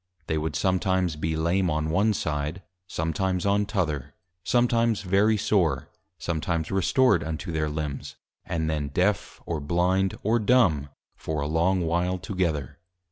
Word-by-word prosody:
They 80 -1 -1
would 75 -2 -3
sometimes 95 0 +1
be 80 +1 -2
Lame 85 +3 +1
on 80 0 -1
one 105 +5 +2
side; 75 +4 -3 0.3
sometimes 90 +3 -1
on 100 +1 +2
t'other. 75 - -2 0.3
Sometimes 115 -3 +2
very 100 +4 +3
sore; 85 -10 +1 0.3
sometimes 80 0 -2
restored 95 0 +3
unto 80 +2 -4
their 80 -1 -1
Limbs, 75 -2 -4 0.3
and 80 -2 -2
then 75 -2 -1
Deaf, 90 +7 0
or 85 -2 -2
Blind, 90 +5 +1
or 115 +3 +2
Dumb, 100 - +3 0.3
for 80 -1 -4
a 70 - -1
long 85 +4 +2
while 85 +2 0
together. 80 -6 -2
85 Hz, 140 wpm, -26 LUFS, 80-95 Hz, 0.3 s, very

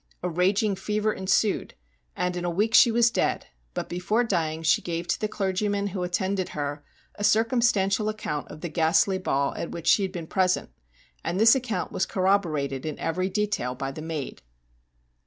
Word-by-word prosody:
A 180 - 0
raging 195 +4 +1
fever 210 +2 -1
ensued, 195 +2 0 0.4
and 180 0 -1
in 175 - -3
a 175 - 0
week 210 +6 0
she 240 - +8
was 235 0 +3
dead, - - 0 0.3
but, - - -3
before 185 +7 0
dying, 165 -7 -1
she 160 - +3
gave 170 0 -4
to - - 0
the 215 - +1
clergyman 200 0 -1
who 190 -1 -4
attended 185 +1 -1
her 145 0 -3 0.3
a 205 - -7
circum 225 +4 +3
stantial 210 -2 +2
account 180 -9 -4
of 155 - -11
the 175 - -4
ghastly 170 +4 +2
ball 140 -6 0
at - - -5
which 170 - -7
she 200 - +5
had 190 -1 -1
been 175 -3 -6
present, 185 - 0 0.5
and 180 - -2
this 225 +1 +7
account 235 -8 -2
was - - -1
corroborated 160 -9 0
in 155 -2 -4
every 185 +3 -1
detail 200 - -1
by 135 +1 -4
the 145 - -8
maid. 155 -3 -5
185 Hz, 185 wpm, -26 LUFS, 165-210 Hz, 0.5 s, she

